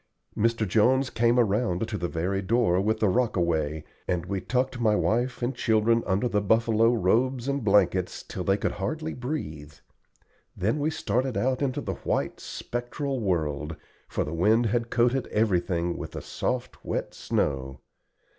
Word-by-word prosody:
Mr. 115 0 +1
Jones 130 +7 +3
came 120 +1 +2
around 110 -2 +1
to 110 - -4
the 90 -3 -2
very 90 +4 -1
door 100 -3 +2
with 110 +2 0
the 110 - +3
rockaway, 85 -9 0 0.2
and 90 -1 -1
we 95 0 -3
tucked 130 0 -1
my 110 -2 +3
wife 120 +4 0
and 125 +2 0
children 115 0 +2
under 100 +6 +1
the 105 -3 +1
buffalo 115 +2 +3
robes 120 +4 +1
and 140 -2 -1
blankets 95 -3 +2
till 90 - -5
they 95 +2 +2
could - - -1
hardly 155 +11 -3
breathe. 80 - -5 0.8
Then 110 +11 0
we 145 +2 +1
started 130 -4 -1
out 130 +1 0
into 140 +1 0
the - - -3
white, - - -1
spectral 130 +3 -4
world, 80 -6 -1 0.3
for - - -1
the 75 - -5
wind 110 +8 +3
had 115 +2 0
coated 120 +2 +2
everything 90 -5 0
with - - -7
the - - -5
soft, - - -3
wet - - -3
snow. 65 -2 -2
110 Hz, 160 wpm, -27 LUFS, 90-125 Hz, 0.8 s, Jones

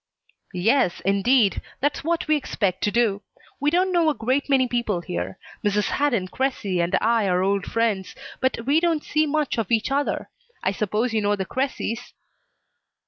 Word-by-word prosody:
"Yes, 220 +1 +2
indeed. 200 +3 +3 0.2
That's 290 +1 -1
what 335 +1 -1
we 310 - +4
expect 205 -9 -1
to 205 - +1
do. 215 -4 +1 0.4
We 290 - +2
don't 365 +4 +2
know 340 -3 +3
a 300 - 0
great 260 +5 0
many 265 -2 +4
people 235 -7 -1
here. 90 - -4 0.3
Mrs. 205 -1 +1
Hadden 245 -10 +1
Cressy 210 -9 -1
and 170 +1 +2
I 225 -2 +2
are 180 0 +2
old 195 -1 0
friends, 220 -5 -1 0.2
but 260 -3 -1
we 285 +4 +4
don't 330 -3 +1
see 305 +1 +1
much 295 -4 0
of 220 -2 -3
each 225 +2 +1
other. 285 +1 -1 0.3
I 190 - +2
suppose 210 +4 -1
you 220 - +1
know 205 0 +2
the 190 -2 -3
Cressys?" 245 -2 -3
230 Hz, 175 wpm, -24 LUFS, 200-280 Hz, 0.4 s, we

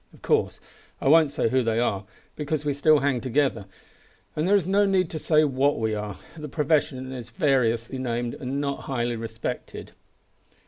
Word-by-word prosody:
Of - - -22
course - - +1 0.4
I - - -2
won't 155 +1 +6
say 125 - 0
who 130 +2 +2
they 115 -1 0
are, 105 -4 0 0.3
because 150 0 -3
we 145 - +1
still 150 +1 +4
hang 135 -3 +1
together, 130 -5 0 0.7
and 155 +3 0
there 200 - +5
is 195 -5 +2
no 200 +2 +3
need 190 -3 +1
to 155 - -4
say 155 0 +3
what 140 0 +1
we 110 -1 0
are. 105 -3 -4 0.2
The 150 -2 -7
profession 145 -3 0
is 125 -3 -7
variously 130 -6 +1
named, 120 -1 -2
and 135 +2 -4
not 140 -1 -3
highly 120 -2 -1
respected. 115 0 -6
135 Hz, 180 wpm, -25 LUFS, 120-150 Hz, 0.7 s, won't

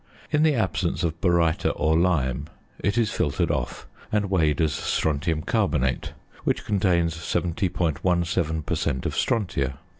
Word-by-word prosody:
In 150 -1 +3
the 155 -2 +4
absence 95 -6 0
of 80 0 -2
baryta 85 -3 +2
or 80 +1 +2
lime 75 -6 +1 0.3
it 100 +4 0
is 110 -2 +2
filtered 85 +1 0
off, 65 -6 -3 0.3
and 105 -2 0
weighed 80 -6 +2
as 80 -3 +2
strontium 80 +1 0
carbonate, 80 - 0 0.3
which - - 0
contains 90 -5 +2
70.17 85 -1 0
per - - -1
cent. 65 -1 -1
of - - -1
strontia. 70 - 0
85 Hz, 140 wpm, -25 LUFS, 75-95 Hz, 0.3 s, the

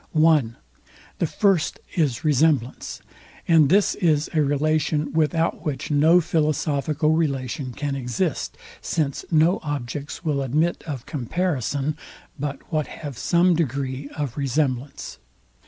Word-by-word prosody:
(1) 155 -7 +3 0.6
The 170 - +1
first 195 -2 +1 0.2
is 145 -3 0
RESEMBLANCE: 145 -4 +1 0.5
And 160 -4 +5
this 200 +2 +4
is 155 -5 +1
a 155 - +3
relation, 150 +1 +1
without 165 +1 +1
which 150 -2 -3
no 155 +4 +5
philosophical 155 -1 0
relation 140 -4 -1
can 145 +3 -3
exist; 135 +5 -2 0.2
since 145 -4 -1
no 165 +2 +3
objects 145 +2 -5
will 145 -3 +1
admit 150 +6 0
of 135 -6 -5
comparison, 145 0 -1 0.4
but 145 -1 -3
what 155 -1 +1
have 145 -4 -7
some 175 +7 +3
degree 140 -3 -2
of 145 -4 -3
resemblance. 135 -1 -2
150 Hz, 120 wpm, -23 LUFS, 135-160 Hz, 0.6 s, And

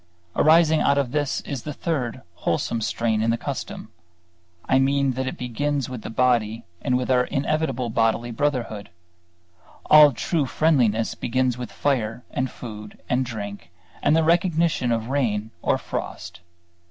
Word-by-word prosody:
Arising 160 0 +5
out 140 - +3
of 135 -4 0
this 145 -2 -1
is 135 -4 -5
the 150 - -6
third 130 -7 -3
wholesome 115 - -1
strain 110 0 0
in 115 - +1
the 115 - +2
custom; - - -6 0.8
I 130 - +4
mean 140 0 +2
that 130 +1 -3
it - - -4
begins 140 +2 -2
with 125 -3 -6
the - - -7
body 115 -2 +1 0.2
and 125 - +1
with 125 +1 -1
our 125 -1 +4
inevitable 135 -4 -1
bodily 115 +1 +1
brotherhood. 120 -6 -2 1.0
All 150 -1 +9
true 145 +3 -1
friendliness 120 -9 +2
begins 130 0 0
with 125 -1 -7
fire 125 -4 -1
and 130 +1 -1
food 105 -3 -9
and 125 +1 +2
drink 100 -7 -7 0.3
and 150 - +3
the 165 - +3
recognition 165 -6 +2
of 115 0 -1
rain 110 -6 -1
or - - +2
frost. 85 0 -6
125 Hz, 155 wpm, -24 LUFS, 115-145 Hz, 1.0 s, All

